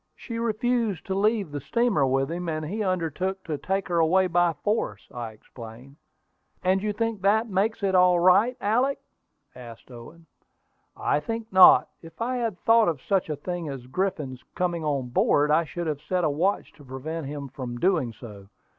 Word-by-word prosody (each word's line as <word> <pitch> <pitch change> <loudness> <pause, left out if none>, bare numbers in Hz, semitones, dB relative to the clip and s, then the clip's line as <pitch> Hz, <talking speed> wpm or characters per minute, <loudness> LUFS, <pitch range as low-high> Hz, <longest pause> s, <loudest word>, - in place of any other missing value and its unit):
She 230 -1 -7
refused 230 -3 -1
to 190 - -3
leave 205 -3 +1
the 145 -1 -5
steamer 215 - +1
with 135 +2 0
him, 175 0 -4
and 155 -1 -3
he 205 +8 -4
undertook 185 0 -2
to 155 - -3
take 195 +1 -2
her 170 -1 0
away 180 +4 +3
by 175 -1 +2
force," 150 - -2
I 120 -2 -5
explained. 115 +4 -13 0.7
"And 190 +1 +2
you 210 0 -1
think 225 -1 -2
that 215 +4 +2
makes 210 +2 -1
it 195 -1 +1
all 180 -1 +5
right, 200 +8 +4
Alick?" 250 +7 +1 0.6
asked 120 0 -12
Owen. 125 +8 -12 0.7
"I - - +1
think 225 +5 -5
not. 185 -1 +8
If 165 -1 -14
I 250 +2 -1
had 230 -6 -2
thought 225 -3 +4
of 160 -5 -3
such 190 +3 -1
a 150 - -1
thing 170 +2 -5
as 135 -3 -7
Griffin's 135 -4 -3
coming 175 -2 -1
on 140 -4 -2
board, 145 +4 +2
I 165 +2 +3
should 175 +2 -5
have 150 -2 -3
set 180 +4 -1
a 155 - +2
watch 180 +8 -1
to 145 - -15
prevent 140 +4 -6
him 140 -1 -6
from 125 -2 -6
doing 160 -6 +1
so. 105 -4 -12
175 Hz, 185 wpm, -25 LUFS, 140-200 Hz, 0.7 s, not